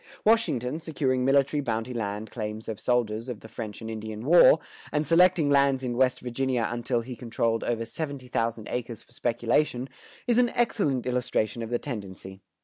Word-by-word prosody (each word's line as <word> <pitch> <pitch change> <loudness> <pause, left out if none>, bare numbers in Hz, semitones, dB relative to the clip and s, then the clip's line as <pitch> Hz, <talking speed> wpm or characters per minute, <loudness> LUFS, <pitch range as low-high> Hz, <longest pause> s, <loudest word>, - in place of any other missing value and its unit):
Washington, 160 - +2
securing 140 -6 -1
military 140 +2 +3
bounty 115 -1 -2
land 105 -1 -4
claims 110 -1 -5
of 110 -2 -4
soldiers 120 -1 0
of 120 -4 -6
the - - -10
French 110 -1 -7
and 110 0 -5
Indian 110 0 -6
War, 170 +1 +7 0.3
and 150 +1 0
selecting 170 -1 +4
lands 140 -1 +3
in 120 -2 -2
West 130 0 +2
Virginia 125 -1 -1
until 120 0 -1
he 125 +2 -7
controlled 115 -1 -1
over 115 -1 -1
seventy 140 +1 -5
thousand 115 -2 -2
acres 120 -2 -4
for - - -25
speculation, 120 +2 0 0.4
is 240 -1 +3
an 245 -1 +4
excellent 195 - +1
illustration 125 -3 -1
of 115 - -5
the 120 - +1
tendency. 95 -6 -7
125 Hz, 170 wpm, -27 LUFS, 115-140 Hz, 0.4 s, War